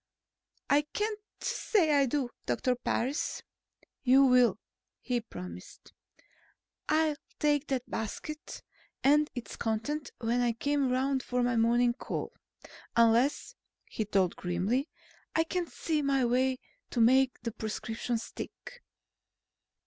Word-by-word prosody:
"I 285 - +5
can't 425 0 -1 0.2
say 355 -8 +1
I 280 -1 +4
do, 255 -1 -1 0.2
Dr. 255 - +1
Parris." 255 +3 -2 0.6
"You 265 +2 +6
will," 250 -5 +5 0.4
he 245 -2 -1
promised. 90 - -10 1.0
"I'll 310 -1 +2 0.2
take 295 0 +2
that 260 -2 -2
basket 265 +8 -5 0.4
and 295 +2 +4
its 245 - -6
contents 230 +7 -2
when 240 +1 0
I 240 -1 +2
come 280 +2 0
around 265 +1 +1
for 250 0 -1
my 245 0 +1
morning 240 +1 +3
call. 250 - -5 0.6
Unless," 235 - +3 0.3
he 220 - -3
told 195 -4 +1
her - - -16
grimly, 195 - 0 0.5
"I 320 - +4
can 345 +1 -2
see 315 -2 -1
my 275 -2 +2
way 255 +2 +2 0.3
to 245 - -2
make 255 +3 +4
the 230 - -3
prescription 225 +2 -3
stick." - - -8
255 Hz, 125 wpm, -30 LUFS, 230-290 Hz, 1.0 s, You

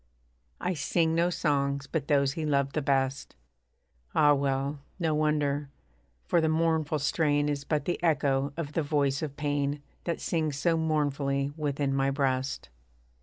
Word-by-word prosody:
I 180 - -1
sing 160 +1 +1
no 170 +1 +2
songs 140 -4 0
but 145 0 -3
those 140 -2 +3
he 160 -1 -4
loved 140 -2 +1
the 155 - 0
best. 135 -1 0 0.8
(Ah! 145 -1 +6
well, 140 +1 -1 0.2
no 165 -4 0
wonder: 150 -2 0 0.6
for 170 - +2
the 160 - +2
mournful 160 -1 +1
strain 145 0 +1
Is 145 -1 -2
but 150 0 -1
the 175 - -2
echo 140 -4 +2
of 150 -3 -4
the 165 - +1
voice 140 -2 0
of 145 -3 -5
pain, 145 -1 -1 0.2
That 170 -2 -2
sings 155 -4 -1
so 165 +2 +2
mournfully 145 -3 0
within 145 -2 -1
my 135 0 +2
breast.) 135 - -1
145 Hz, 155 wpm, -28 LUFS, 140-155 Hz, 0.8 s, Ah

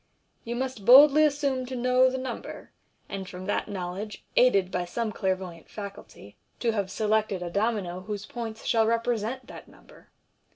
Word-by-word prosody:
You 235 +1 -4
must 255 -4 -4
boldly 280 +6 +8
assume 280 -3 0
to 260 - -5
know 255 +1 +4
the 260 - -3
number, 255 -2 -7 0.4
and 195 -1 -6
from 185 0 -8
that - - -1
knowledge, 195 +2 -6
aided 200 -7 +4
by 180 0 -1
some 220 +5 -3
clairvoyant 185 -5 -3
faculty, 200 - -10 0.2
to 235 - +1
have 200 -3 -2
selected 210 -3 0
a 175 - -5
domino 200 -3 -1
whose 205 +2 -6
points 225 -2 -7
shall 225 -2 +3
represent 230 +2 -1
that - - -11
number. - - -19
220 Hz, 160 wpm, -27 LUFS, 190-250 Hz, 0.4 s, boldly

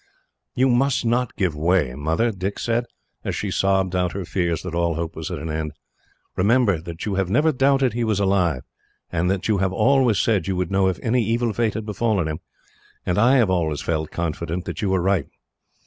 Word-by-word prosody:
"You 130 +1 +3
must 130 0 +2
not 120 +1 0
give 90 -7 0
way, 80 -3 +1
Mother," 80 - 0
Dick 95 0 -4
said, 120 +1 0 0.4
as - - -2
she - - -3
sobbed 95 -1 +1
out 90 -1 0
her 95 -2 -4
fears 85 -2 -1
that 90 -2 -5
all 85 -1 0
hope 85 0 -4
was 80 -1 -5
at - - -4
an 80 +2 -5
end. 75 -1 -3 0.6
"Remember 100 -3 +3
that 85 0 -7
you 105 - -2
have 95 -2 0
never 150 +10 +3
doubted 135 -1 +2
he 120 0 -1
was 110 -3 0
alive, 90 -9 +1 0.5
and 85 +1 0
that 95 -1 -1
you 105 -3 +2
have 95 -1 +1
always 125 +1 +3
said 100 -5 +1
you 95 - -1
would 90 -1 -2
know 95 -1 +3
if 95 - 0
any 120 0 +2
evil 115 +1 0
fate 115 -1 0
had 110 - -4
befallen 105 -4 0
him; 80 0 -4 0.7
and 90 - +1
I 120 +5 +5
have 115 -8 +3
always 80 -5 0
felt 80 -2 -1
confident 85 +1 -3
that - - -5
you 100 - 0
were 95 -2 +1
right. 95 -1 +1
95 Hz, 210 wpm, -22 LUFS, 85-115 Hz, 0.7 s, I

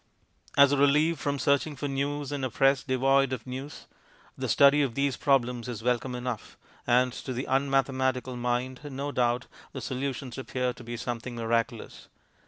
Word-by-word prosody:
As 140 -1 +7
a 145 - +2
relief 150 +3 +3
from 145 +1 -1
searching 140 +2 +1
for 140 +2 -3
news 140 +1 -2
in 140 -2 -3
a 130 - 0
press 135 +2 +3
devoid 135 +1 +2
of 125 -4 -4
news, 135 +3 -7 0.5
the - - -4
study 140 +1 +6
of 130 -5 -1
these 140 -2 +1
problems 125 -3 +1
is 115 -3 -6
welcome 125 +1 0
enough, 125 -3 -5 0.3
and 125 +1 +3
to 130 - -6
the 125 +2 -3
unmathematical 130 -1 0
mind, 125 +1 -2
no 140 0 -4
doubt, 120 -1 +1 0.3
the 135 - -5
solutions 130 0 -4
appear 125 -1 -2
to 120 - -12
be 120 0 -6
something 120 0 -5
miraculous. 115 0 -2
130 Hz, 170 wpm, -28 LUFS, 125-140 Hz, 0.5 s, As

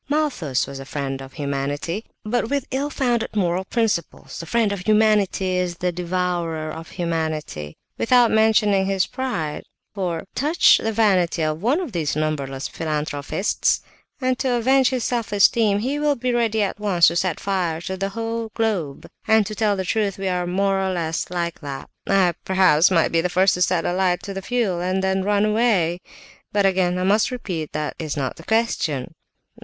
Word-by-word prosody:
"Malthus 275 - 0
was 140 0 -8
a 135 - -8
friend 135 -1 -4
of 135 0 -10
humanity, 145 +7 -3 0.2
but, 225 +1 -1
with 280 -2 -1
ill 275 +3 -1
founded 240 -6 -1
moral 180 -2 +1
principles, 220 -7 -2
the 165 - -7
friend 230 -3 +1
of 200 - -3
humanity 210 -1 +2
is 180 -1 -1
the 180 0 -1
devourer 175 -3 -2
of 165 0 -8
humanity, 155 - -3 0.2
without 245 0 +4
mentioning 210 -3 +3
his 195 -1 +1
pride; 175 - -3 0.3
for, 180 -5 -2
touch 305 +5 +4
the 225 - -1
vanity 185 -7 +2
of 155 +1 -1
one 255 - +2
of 350 -9 -4
these 160 -7 -1
numberless 140 -3 -2
philanthropists, 155 +3 -1 0.4
and 255 -2 0
to 260 -2 0
avenge 260 +2 +3
his 255 -3 -2
self 235 -4 -2
esteem, 205 0 +4
he 265 +7 -1
will 295 -1 +2
be 250 0 -1
ready 225 -3 +1
at 200 - -3
once 185 -6 +4
to 170 - -5
set 175 -1 0
fire 180 -5 -1
to 185 +3 -4
the 195 +1 -2
whole 230 +2 -4
globe; 195 -11 -1 0.2
and 220 -1 +4
to 215 - -5
tell 210 -1 +1
the 190 -1 -3
truth, 205 -1 0
we 195 0 -3
are 180 -1 0
all 175 - -3
more 195 +2 +1
or 190 0 0
less 165 -3 -2
like 170 -1 -3
that. 140 -3 -7 0.2
I, 190 -3 +3
perhaps, 185 -4 +4
might 170 -4 +2
be 165 - +2
the 180 - -1
first 185 +2 +3
to 180 - -3
set 180 -2 +2
a - - 0
light 180 -1 +1
to 200 - -5
the 195 - -5
fuel, 200 -5 -1
and 185 +1 -1
then 190 0 +1
run 205 +1 +2
away. 210 -6 +2 0.5
But, 205 -1 +2
again, 185 -2 +2
I 180 - -1
must 205 +3 +3
repeat, 180 -11 -4
that 150 -1 -2
is 155 -3 -4
not 135 -2 -2
the 165 - -11
question." 170 - 0
190 Hz, 190 wpm, -22 LUFS, 165-220 Hz, 0.5 s, without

